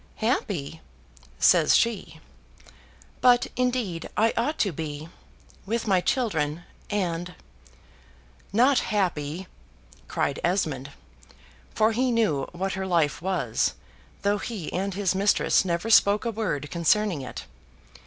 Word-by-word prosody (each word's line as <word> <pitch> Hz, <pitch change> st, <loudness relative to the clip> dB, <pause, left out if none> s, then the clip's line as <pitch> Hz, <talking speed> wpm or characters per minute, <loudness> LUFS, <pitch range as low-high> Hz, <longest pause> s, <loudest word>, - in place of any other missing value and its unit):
"Happy!" 200 Hz, -, -2 dB, 0.6 s
says -, -, +5 dB
she; 195 Hz, -9 st, 0 dB, 1.0 s
"but 245 Hz, -1 st, +5 dB
indeed 245 Hz, -9 st, -1 dB
I 225 Hz, +2 st, +3 dB
ought 275 Hz, +7 st, 0 dB
to 200 Hz, -, +1 dB
be, 155 Hz, 0 st, -6 dB, 0.6 s
with 230 Hz, +2 st, -1 dB
my 190 Hz, -4 st, +3 dB
children, 170 Hz, -, -1 dB, 0.3 s
and 180 Hz, -3 st, -2 dB, 0.6 s
" 60 Hz, +4 st, -29 dB
"Not 270 Hz, +1 st, +5 dB
happy!" 180 Hz, -4 st, -2 dB, 0.6 s
cried 140 Hz, -, -1 dB
Esmond 155 Hz, -7 st, -1 dB, 0.9 s
(for 220 Hz, +1 st, +3 dB
he 250 Hz, +3 st, +1 dB
knew 210 Hz, -, +1 dB
what 190 Hz, +2 st, -3 dB
her 190 Hz, 0 st, -3 dB
life 165 Hz, -4 st, +1 dB
was, 175 Hz, -11 st, 0 dB, 0.5 s
though 205 Hz, +1 st, +2 dB
he 205 Hz, -7 st, -5 dB
and 195 Hz, +1 st, -2 dB
his 195 Hz, -2 st, +1 dB
mistress 200 Hz, +1 st, +3 dB
never 175 Hz, +4 st, -1 dB
spoke 205 Hz, +1 st, +5 dB
a 230 Hz, -, 0 dB
word 185 Hz, -10 st, -3 dB
concerning 175 Hz, 0 st, +1 dB
it). 130 Hz, -, -7 dB
190 Hz, 120 wpm, -26 LUFS, 160-220 Hz, 1.0 s, says